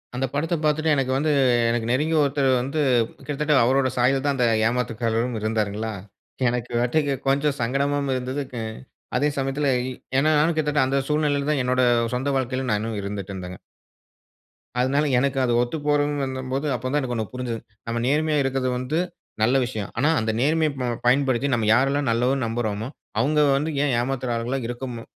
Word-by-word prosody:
அந்த 130 +2 0
படத்த 160 +4 0
பாத்துட்டு 155 +1 +1
எனக்கு 135 -2 0
வந்து 150 +3 +1 0.4
எனக்கு 115 -1 -1
நெருங்கிய 155 +5 +1
ஒருத்தரு 140 -1 +1
வந்து 140 +5 -3 0.4
கிட்டத்தட்ட 150 +1 -1
அவரோட 130 +2 +3
சாயல்தான் 135 +3 +2
அந்த 125 -2 +3 0.2
ஏமாத்துக்காரரும் 115 0 -1
இருந்தாருங்களா?" 110 0 -1 0.6
எனக்கு 120 0 -3
வட்டிக்கு 140 +4 +1
கொஞ்சம் 140 +1 +1
சங்கடமாவும் 140 +3 0
இருந்தது. 130 +3 -3 0.2
அ - - -3 0.5
அதே 140 +4 +2
சமயத்தில 135 +2 -1 0.5
ஏன்னா, 145 +3 +3
நானும் 160 +2 +2
கிட்டத்தட்ட 150 -3 +2
அந்த 135 +1 0
சூழ்நிலையில 150 -1 +1
தான் 145 -3 +1
என்னோட 125 +1 +1 0.3
சொந்த 130 +3 -1
வாழ்க்கையில 130 0 -2
நான் 105 -2 +1
இன்னும் 110 -1 -3
இருந்துடட்டு 100 -1 -5
இருந்தங்க. 90 -1 -7 1.2
அதனால 140 +4 +2
எனக்கு 135 +1 0
அது 120 - +1
ஒத்துப்போறன்னு 145 +1 0
வந்தம்போது 130 +2 -3
அப்ப 125 0 -5
தான் 150 - +2
எனக்கொண்ணு 120 -4 -2
புரிஞ்சது. 120 -3 -3 0.3
நம்ம 115 0 -2
நேர்மையா 150 +2 +2
இருக்கது 135 -1 0
வந்து 130 +6 -2 0.4
நல்ல 120 +5 +4
விஷயம். 110 -5 -5
"ஆனா, 140 +5 +3
அந்த 110 0 -1
நேர்மைய 155 +3 +2
ப - - -1 0.2
பயன்படுத்தி 130 0 +3
நம்ம 115 -2 0
யாரெல்லாம் 135 +2 +2
நல்லவர்ன்னு 125 +2 +1
நம்புறோமோ! 110 -1 -2 0.3
அவுங்க 150 +6 +1 0.2
வந்து 150 +3 -1
ஏன் 140 - +1
ஏமாத்துற 125 0 -2
ஆளுகளா 120 +4 -2
இருக்கமு 120 -1 -5
130 Hz, 155 wpm, -23 LUFS, 120-145 Hz, 1.2 s, நல்ல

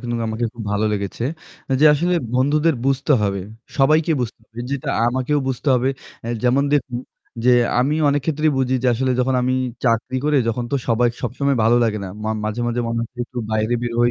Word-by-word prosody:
কিন্তু 120 -2 -3
আমাকে 110 +2 -2
খুব 115 -2 -8
ভালো 105 +1 +1
লেগেছে 100 +3 -3 0.6
যে 155 - +6
আসলে 175 +4 +1 0.2
বন্ধুদের 150 +4 +2
বুঝতে 135 +2 +2
হবে। 100 -2 0 0.4
সবাইকে 155 +4 +4
বুঝতে 120 -2 -4
হবে 115 - -15
যে - - -3
এটা - - -4 0.2
আমাকেও 130 +4 0
বুঝতে 130 +3 -2
হবে। 125 +1 +1 0.5
যেমন 125 +3 +3
দেখুন 125 -3 -1 0.5
যে 125 - +5 0.3
আমি 140 +4 +1
অনেক 145 0 +2
ক্ষেত্রেই 155 -1 +1
বুঝি 130 0 +1
যে - - +1
আসলে 130 +2 0
যখন 130 +1 +1
আমি 130 +1 +1 0.3
চাকরি 115 +2 +1
করে 150 -1 +2
যখন 120 +2 -1
তো 140 - +3
সবাই 120 +1 +3
সবসময় 135 +3 0
ভালো 115 +2 +4
লাগে 105 -2 0
না। - - -5 0.2
মা 110 - -1
মাঝে, 110 +2 -2
মাঝে 120 0 -1
মনে 115 0 -2
হয় 115 - -5 0.2
একটু 125 - -8
বাইরে 110 +2 +1
বের 120 -1 -2
হই। 120 0 +4
125 Hz, 200 wpm, -21 LUFS, 115-140 Hz, 0.6 s, যে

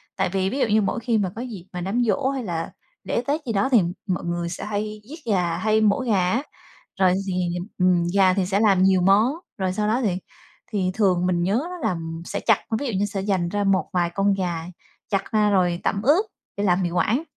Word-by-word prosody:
tại 190 -1 0
vì 190 +1 0
ví 270 - -3
dụ - - +2
như 215 0 +3
mỗi 195 +3 -1
khi 230 -1 0
mà 200 -3 0
có 230 - -5
dịp 220 -8 -7
mà 180 - -4
đám 200 +7 0
giỗ 260 +4 +1
hay 270 -2 -3
là 170 -5 -3 0.3
lễ 235 - -1
tết 295 +3 0
gì 230 - -2
đó 200 +6 +1
thì 240 -6 +5 0.3
mọi 185 -3 -1
người 170 0 -2
sẽ 170 - -6
hay 210 0 -3
giết 315 +3 -8
gà, 175 -3 0
hay 215 +3 +2
mổ 210 +1 +3
gà 200 -8 +1
á. 240 +7 0 0.6
Rồi 185 -2 +4
thì, 190 - -1 0.4
ừm, 180 -2 +3
gà 190 -2 +5
thì 190 -1 0
sẽ 195 +2 0
làm 195 -4 +4
nhiều 190 -1 +4
món, 205 +8 +4 0.2
rồi 185 -1 -1
sau 210 +2 -1
đó 230 +4 +1
thì 210 - +2 0.6
thì 190 -4 0
thường 185 -4 +2
mình 175 -1 +1
nhớ 200 +7 +1
á 360 - -6
là 180 - -1 0.3
sẽ 200 - -3
chặt, - - +3 0.2
ví 285 - -3
dụ 235 - -2
như 205 - +2
sẽ 200 -1 -3
dành 190 -3 0
ra 205 +2 -1
một 195 -1 +2
vài 175 -1 +1
con 200 0 +3
gà, 175 -4 -2 0.4
chặt 195 -3 -1
ra 215 -1 +3
rồi 180 -3 +2
tẩm 200 - 0
ướp 305 - +4 0.3
để 200 - -1
làm 185 -1 +2
mì 175 - 0
Quảng, 215 - +1
195 Hz, 240 wpm, -23 LUFS, 185-220 Hz, 0.6 s, thì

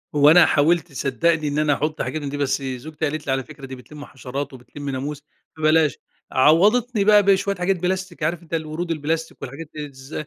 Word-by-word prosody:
هو 145 0 +6
أنا 175 0 +8
حاولت 160 +3 +2
صدقني 155 +3 0
إن 145 +1 -1
أنا 150 -1 +3
أحط 155 +2 -2
حاجات 155 - -3
من 140 - -4
دي 145 - -4
بس 140 0 0
زوجتي 140 +4 -4
قالت 155 +1 -5
لي: - - +1
"على 135 0 0
فكرة 135 +3 -11
دي 130 0 -7
بتلم 145 +3 -11
حشرات، 135 +1 -6
وبتلم 140 +3 -8
ناموس 140 +2 -4 0.3
فبلاش" 155 -2 +3 0.3
عوضتني 205 - +4
بقى 210 0 +6
بشوية 200 +1 +2
حاجات 180 +1 0
بلاستيك، 185 -1 -3
عارف 170 +2 -1
أنتَ 165 - -14
الورود 160 +2 -3
البلاستيك 160 +1 -3
والحاجات 145 +5 -8
الز؟ 140 -2 -9
155 Hz, 195 wpm, -22 LUFS, 140-170 Hz, 0.3 s, أنا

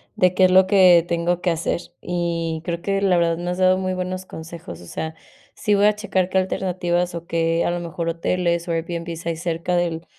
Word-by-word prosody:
de 185 -4 +3
qué 185 0 +5
es 185 - +3
lo 185 0 +6
que 185 -4 +6
tengo 170 +1 0
que 175 - +1
hacer, 165 +1 -1 0.2
y 170 -2 -2
creo 170 -1 -3
que 195 +1 -1
la 190 -3 +3
verdad 170 -1 +2
me 175 +1 -4
has 180 - -3
dado 185 0 +4
muy 185 0 -2
buenos 185 0 -4
consejos, 160 - -9
o - - -12
sea, 160 - -5 0.4
sí 210 - +1
voy 200 +1 +4
a 210 0 +4
checar 190 -3 -1
qué 190 - 0
alternativas, 180 -2 -1
o 170 0 -6
qué 165 0 +1
a - - +1
lo 175 - -2
mejor, 170 0 -4
hoteles 170 +1 -1
o 170 - -1
Airbnb 165 0 -4
hay 170 -1 -1
cerca 170 +1 -2
del 170 -1 -1
175 Hz, 225 wpm, -22 LUFS, 170-185 Hz, 0.4 s, lo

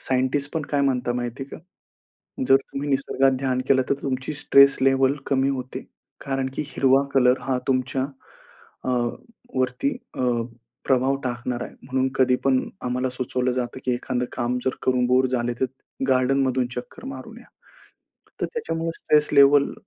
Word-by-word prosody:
Scientist 130 +2 0
पण 160 - 0
काय 145 - +2
म्हणतात 125 -3 0
माहिती 120 +2 -4
आहे 135 - -8
का? - - -16 0.9
जर 135 - +8
तुम्ही 140 +1 -5
निसर्गात 135 -1 +2
ध्यान 130 -1 0
केलं 130 -1 +5
तर - - +3
तुमची 135 +1 -2
स्ट्रेस 140 -1 +6
लेव्हल 135 +1 +4
कमी 135 0 +2
होते. 130 -2 -4 0.4
कारण 135 -1 -1
की - - -2
हिरवा 135 0 +3
कलर 125 -1 +4
हा 130 -1 -1
तुमच्या 130 0 0 0.8
अ, - - -3 0.7
वरती 130 +2 0 0.3
अ, - - 0 0.6
प्रभाव 130 +1 +2
टाकणारा 120 0 -3
आहे. - - -15
म्हणून 130 0 0
कधी 130 -1 +4
पण 135 -1 +4 0.3
आम्हाला 125 +1 -1
सुचवलं 125 0 -1
जातं 125 0 -3
की 125 - +1
एखादं 125 0 -2
काम 120 +1 -1
जर 130 - 0
करून 125 -1 +2
बोर 130 +1 +4
झाले 120 -1 -1
तर - - +3 0.4
गार्डनमधून 130 0 +2
चक्कर 125 - -8
मारून 270 - -8
या. - - -17 0.9
तर - - +1
त्याच्यामुळे 165 - -3
स्ट्रेस 150 -2 +2
लेव्हल 140 0 +6
130 Hz, 155 wpm, -24 LUFS, 125-135 Hz, 0.9 s, जर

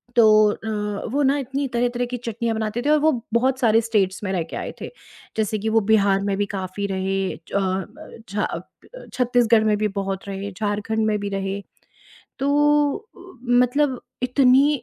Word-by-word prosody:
तो 235 -2 +6 0.3
अ, 210 -1 -4
वो 285 +3 +1
ना 275 +1 +3
इतनी 270 +1 -2
तरह-तरह 245 0 -1
की 250 - -2
चटनियाँ 230 -1 -3
बनाते 220 +1 -2
थे 285 - -1
और 305 0 +5
वो 315 +2 +4 0.2
बहुत 255 +2 +2
सारे 225 -2 +4
स्टेट्स 210 -4 0
में 190 - -2
रह 175 -3 0
के - - -5
आए - - -5
थे, - - -5 0.5
जैसे 215 0 0
कि 220 +2 -1
वो 225 0 +3
बिहार 200 -2 +4
में 200 -1 0
भी 205 - +1
काफ़ी 190 +1 -3
रहे 190 0 -1
च - - -13
अ, 190 +1 -3
छा 205 +1 -1
अ - - -3 0.4
अ, - - -10
छत्तीसगढ़ 240 -3 +3
में 210 -1 +2
भी 215 +1 +1
बहुत 195 0 -4
रहे, 200 +1 -5
झारखंड 210 +2 -1
में 215 -1 +1
भी 205 0 -3
रहे, 195 0 -3 0.8
तो 290 +1 +3
अ, 435 +2 -16 0.3
मतलब 250 +2 +2 0.2
इतनी 265 +2 +4
220 Hz, 185 wpm, -22 LUFS, 200-255 Hz, 0.8 s, तो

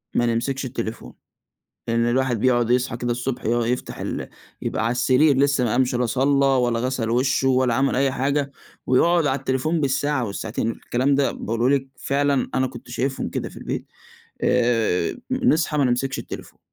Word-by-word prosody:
ما 120 - +3
نمسكش 125 +4 -1
التليفون، 115 -3 -5 0.8
لإن 115 0 +2
الواحد 125 -2 +1
بيقعد 120 -2 +2
يصحى 125 -1 +1
كده 120 0 -1
الصبح 120 +1 -4
يُقع 120 +1 +1
يفتح 125 +1 -3
ال - - -4 0.3
يبقى 110 - -1
على 115 - +1
السرير 130 +4 +3
لسّه 140 -1 +2
ما 120 - 0
قامش 130 0 +1
لا 125 0 +1
صلّى 140 +3 +2
ولا 125 -3 +2
غسَل 125 -2 -1
وشُّه 135 +2 +2
ولا 130 -2 +2
عمل 135 +2 +1
أي 135 0 +2
حاجة، 140 +1 -1 0.3
ويقعد 165 +5 +3
على 135 -1 +1
التليفون 135 +5 -1
بالساعة 140 -1 0
والساعتين، 110 +2 -3
الكلام 130 +4 0
ده 140 0 +2
باقوله 115 +4 -1
لِك 135 0 -5
فعلًا 140 0 0
أنا 130 - +2
كنت 125 -1 -10
شايفهم 130 +2 -2
كده - - -4
في - - -15
البيت، - - -5 0.6
آآ 115 -8 +1
نصحى 170 -12 +2
ما 140 - +3
نمسكش 130 +2 0
التليفون، - - -9
130 Hz, 170 wpm, -23 LUFS, 120-135 Hz, 0.8 s, ما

